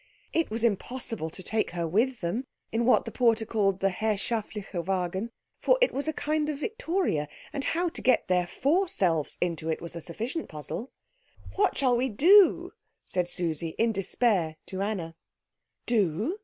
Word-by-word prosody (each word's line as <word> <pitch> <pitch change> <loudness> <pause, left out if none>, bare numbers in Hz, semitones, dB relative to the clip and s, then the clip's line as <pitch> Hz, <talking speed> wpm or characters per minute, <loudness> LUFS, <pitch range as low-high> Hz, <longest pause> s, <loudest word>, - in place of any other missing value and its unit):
It 330 - +1
was 225 +1 -2
impossible 225 -4 -1
to 185 +4 -9
take 220 +3 0
her 170 -1 0
with 230 +9 +1
them 220 +10 -2 0.2
in 230 +1 0
what 255 - +4
the - - -5
porter 230 -3 +2
called 200 -4 0
the 195 0 +3
herrschaftliche 210 -2 -2
Wagen, 190 +3 -1 0.3
for - - +3
it - - +4
was 280 +3 0
a - - +2
kind 305 0 -1
of 300 - -2
victoria, 365 - -1 0.3
and 280 - -2
how 350 +2 +1
to - - -6
get 255 -2 +3
their 180 -1 +2
four 335 - +1
selves 165 - +1
into 165 -2 -1
it 160 - -1
was 170 0 -6
a 170 - -5
sufficient 230 - -4
puzzle. 155 - -3 0.7
"What 395 -1 +2
shall 255 -3 +3
we 255 +2 +1
do?" 365 - +5 0.3
said 180 -1 -1
Susie, 165 -2 -2
in 230 0 +3
despair, 195 -4 +1
to 190 0 -5
Anna. 195 -6 -2 0.7
"Do? 220 - +1
220 Hz, 170 wpm, -28 LUFS, 180-265 Hz, 0.7 s, do